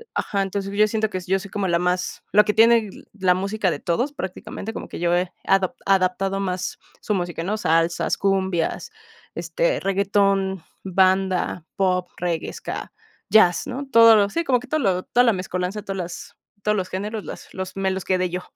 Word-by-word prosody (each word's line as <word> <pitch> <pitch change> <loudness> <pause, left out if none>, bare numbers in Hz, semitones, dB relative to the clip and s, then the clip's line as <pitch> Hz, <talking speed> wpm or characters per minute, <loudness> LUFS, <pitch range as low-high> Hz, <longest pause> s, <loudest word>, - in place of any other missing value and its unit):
Ajá, 200 -1 -1
entonces 195 0 -3
yo 215 0 +5
siento 220 0 0
que 185 - -3
yo 190 +1 +2
soy 200 +1 -10
como 200 -2 -1
la 170 -1 +2
más 180 +1 -1
la 210 +1 +6
que 210 - +1
tiene 225 -1 +5 0.2
la 190 -3 +2
música 195 +1 -1
de 145 - -3
todos 240 - -1
prácticamente 195 -1 -6
como - - -6
que - - -8
yo 170 0 +1
he 180 0 0
adap 195 -1 +2
adaptado 195 0 +2
más 185 -2 -3 0.2
su 210 - -1
música 175 -2 -3
¿no?, 205 +5 -1
salsas, 165 -3 +1
cumbias, 190 -3 0 0.4
este, - - 0
reguetón, 195 -1 +1 0.2
banda, 185 -2 +1
pop, 180 -2 +1
reggae, 170 -2 -2
ska, - - -6 0.4
jazz, 180 -6 +5
¿no?, 270 +2 -5
todo 230 -1 +8
lo 200 -1 +3
sí, 335 +11 -1
como 255 -4 +3
que 250 - -12
todo 310 +4 0
lo 190 -5 +1
toda 245 - +3
la 230 - +4
mescolanza, 185 +2 -3
todas 195 -1 -5
las 175 -1 -6 0.3
todos 210 0 +1
los 185 -2 -2
géneros, 210 +3 -4
las - - -9
los 190 -1 -5
me 195 0 +1
los 190 -1 -4
quedé 185 -1 +1
yo. 180 +1 -3
195 Hz, 190 wpm, -23 LUFS, 180-210 Hz, 0.4 s, todo